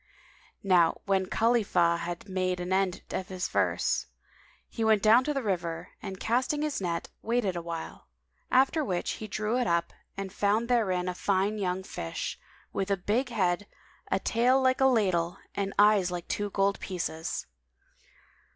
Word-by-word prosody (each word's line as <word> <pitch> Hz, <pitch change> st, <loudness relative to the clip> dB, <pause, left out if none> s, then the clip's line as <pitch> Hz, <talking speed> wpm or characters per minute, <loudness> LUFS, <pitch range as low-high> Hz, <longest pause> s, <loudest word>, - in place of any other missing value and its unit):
Now 180 Hz, -4 st, +4 dB
when 190 Hz, -1 st, +1 dB
Khalifah 205 Hz, -8 st, +2 dB
had 175 Hz, +3 st, -5 dB
made 185 Hz, -1 st, -1 dB
an 180 Hz, +1 st, -2 dB
end 190 Hz, -2 st, 0 dB
of 185 Hz, -, -3 dB
his 185 Hz, -1 st, -3 dB
verse, -, -, 0 dB, 0.6 s
he 225 Hz, -, -4 dB
went 220 Hz, -2 st, +3 dB
down 225 Hz, +4 st, +6 dB
to 300 Hz, -, 0 dB
the 275 Hz, -3 st, -2 dB
river 175 Hz, -5 st, -2 dB
and 190 Hz, -1 st, -6 dB
casting 260 Hz, +6 st, 0 dB
his 300 Hz, -8 st, -2 dB
net, 170 Hz, -2 st, -2 dB
waited 225 Hz, -5 st, 0 dB
awhile; 170 Hz, -1 st, -6 dB, 0.4 s
after 270 Hz, +5 st, +3 dB
which 180 Hz, -9 st, -1 dB
he 215 Hz, -, -6 dB
drew 215 Hz, +3 st, -1 dB
it 245 Hz, -, 0 dB
up 170 Hz, 0 st, 0 dB, 0.2 s
and 195 Hz, -1 st, -5 dB
found 215 Hz, +4 st, +1 dB
therein 190 Hz, -7 st, +1 dB
a 180 Hz, -, -1 dB
fine 200 Hz, +3 st, 0 dB
young 185 Hz, -1 st, -1 dB
fish, 85 Hz, -, -5 dB, 0.3 s
[FN#194] -, -, -42 dB
with 195 Hz, 0 st, -2 dB
a 200 Hz, -, +2 dB
big 225 Hz, +8 st, 0 dB
head, 195 Hz, -3 st, 0 dB, 0.4 s
a -, -, +2 dB
tail 245 Hz, +3 st, +3 dB
like 260 Hz, +1 st, +2 dB
a -, -, +6 dB
ladle 185 Hz, -7 st, +1 dB, 0.2 s
and 195 Hz, -1 st, -2 dB
eyes 205 Hz, -3 st, +5 dB
like 175 Hz, -1 st, -5 dB
two 205 Hz, 0 st, -2 dB
gold 200 Hz, 0 st, +1 dB
pieces. 170 Hz, -3 st, -3 dB
195 Hz, 165 wpm, -29 LUFS, 180-225 Hz, 0.6 s, down